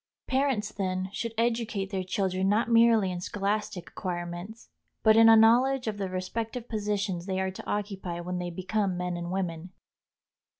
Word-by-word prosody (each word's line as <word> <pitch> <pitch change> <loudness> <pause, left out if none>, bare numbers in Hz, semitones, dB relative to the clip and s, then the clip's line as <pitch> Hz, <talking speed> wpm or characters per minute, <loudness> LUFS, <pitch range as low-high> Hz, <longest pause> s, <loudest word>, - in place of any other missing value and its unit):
Parents, 260 -6 0
then, 185 -1 -2
should 230 +1 -4
educate 225 -4 -1
their 190 -2 -1
children 190 0 0
not 225 +3 +1
merely 230 -4 +5
in 175 -1 -4
scholastic 200 -1 -2
acquirements, 175 +3 -5 0.4
but 220 -1 +6
in 225 0 +8
a 225 - +9
knowledge 245 +4 +5
of 210 -2 -3
the 195 -1 -2
respective 225 +6 -4
positions 205 -4 -2
they 190 -1 -1
are 190 0 -1
to 185 - -10
occupy 195 -4 -3
when 180 +1 -4
they 175 0 -3
become 185 +2 -1
men 180 0 -2
and 175 0 -5
women. 180 -1 -3
195 Hz, 165 wpm, -28 LUFS, 185-225 Hz, 0.4 s, a